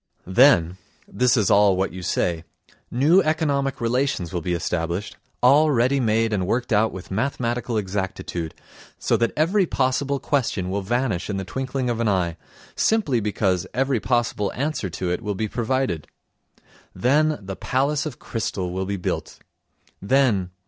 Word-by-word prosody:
Then—this 95 - +2
is 110 -1 +2
all 100 -2 +5
what 95 -1 -1
you 95 - -7
say—new 105 - 0
economic 150 -4 0
relations 120 -7 -1
will 90 - -1
be 90 +1 -1
established, 85 +3 -2 0.3
all 145 +5 +6
ready 130 +1 +2
made 115 -2 +1
and 95 -3 0
worked 120 +2 0
out 110 +2 +3
with 95 0 -9
mathematical 120 +1 -1
exactitude, 95 -4 -3 0.4
so - - +1
that 115 -1 +1
every 180 +5 +2
possible 135 +1 0
question 115 -12 -1
will 100 +1 -1
vanish 110 -3 -1
in 100 - -2
the 95 - -4
twinkling 130 +4 -3
of 120 -1 -1
an 115 - +1
eye, 90 -4 0 0.4
simply 195 - +2
because 100 -4 0
every 135 -1 +1
possible 115 -4 0
answer 140 -7 -2
to 90 +1 -3
it 90 - -2
will 105 0 -3
be 110 +3 -2
provided. 120 - -1 0.9
Then 150 +4 +2
the 95 -1 -7
"Palace 140 +7 0
of 135 - -7
Crystal" 95 -5 -3
will 95 +1 -3
be 100 0 -2
built. 90 - -4 0.6
Then 110 -5 +2
115 Hz, 150 wpm, -23 LUFS, 95-135 Hz, 0.9 s, all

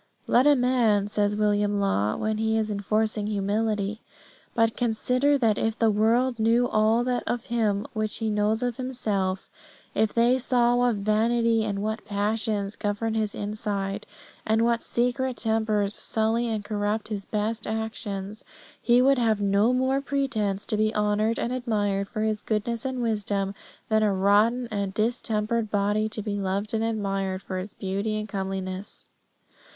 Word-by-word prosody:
"Let 250 +4 +4
a 295 - +7
man," 235 -6 +2
says 205 0 +1
William 205 -1 +1
Law 110 - +1
when 215 0 -2
he 220 0 +1
is 215 -1 -1
enforcing 210 +1 -1
humility, 210 +1 -1 0.5
"but 225 -1 +2
consider 250 +5 +1
that 225 -5 +2
if 225 0 -1
the 225 -1 +3
world 230 +4 +2
knew 230 +2 +3
all 220 +1 +2
that 250 0 0
of 240 0 -2
him 210 -3 +1
which 215 -1 -2
he 220 -1 -1
knows 210 +2 +1
of 245 -2 -2
himself: 205 -7 -2 0.5
if 220 - +1
they 240 +2 +3
saw 245 -1 +2
what 245 -1 +2
vanity 225 +2 +2
and 200 -2 -2
what 220 +1 -3
passions 210 0 -1
govern 215 +1 -2
his 215 -2 -1
inside, 205 -1 -3 0.4
and 220 +1 +2
what 235 0 +1
secret 250 +1 -1
tempers 220 -3 0
sully 225 +3 0
and 215 -3 -3
corrupt 210 +1 -2
his 200 -3 -4
best 215 +1 -2
actions, 215 -2 -4 0.4
he 245 +1 +4
would 270 0 +4
have 220 -3 +2
no 200 +3 +3
more 260 +2 +1
pretence 220 -8 -1
to 215 - -1
be 215 +1 +1
honoured 210 +2 +1
and 240 - -2
admired 205 -5 -1
for 215 - -4
his 215 -1 -1
goodness 225 +2 -2
and 260 -2 -2
wisdom 205 -3 -1 0.3
than 220 0 +2
a 210 -1 +3
rotten 205 +6 +3
and 200 -2 -2
distempered 220 0 0
body 205 +1 +1
to 215 -1 -5
be 205 -1 -2
loved 200 +2 -2
and 220 0 0
admired 195 -4 -2
for 185 -1 -4
its 190 +2 -8
beauty 200 +3 -2
and 215 0 -3
comeliness. 190 -1 -5
215 Hz, 160 wpm, -26 LUFS, 205-230 Hz, 0.5 s, a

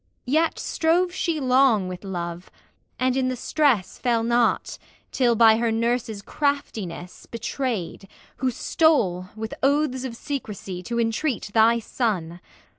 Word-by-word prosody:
Yet 315 +6 +1
strove 345 +3 +1
she 335 -3 -1
long 255 -7 +3
with 180 +1 -7
love, 175 -2 -5 0.5
and 255 0 +1
in 265 -1 +1
the 255 - -1
stress 260 -6 +1
Fell 235 -3 +1
not, 235 0 +1 0.3
till 240 -3 +2
by 220 -1 +6
her 230 0 +1
Nurse's 225 -2 -1
craftiness 220 - -3
Betrayed, 230 -5 -4 0.3
who 260 - 0
stole, 225 - +1
with 220 0 -5
oaths 275 -2 +1
of 250 -3 -5
secrecy, 210 -9 -5
To 235 +5 -3
entreat 230 0 -1
thy 225 +1 +5
son. 200 -8 -2
235 Hz, 130 wpm, -24 LUFS, 205-265 Hz, 0.5 s, by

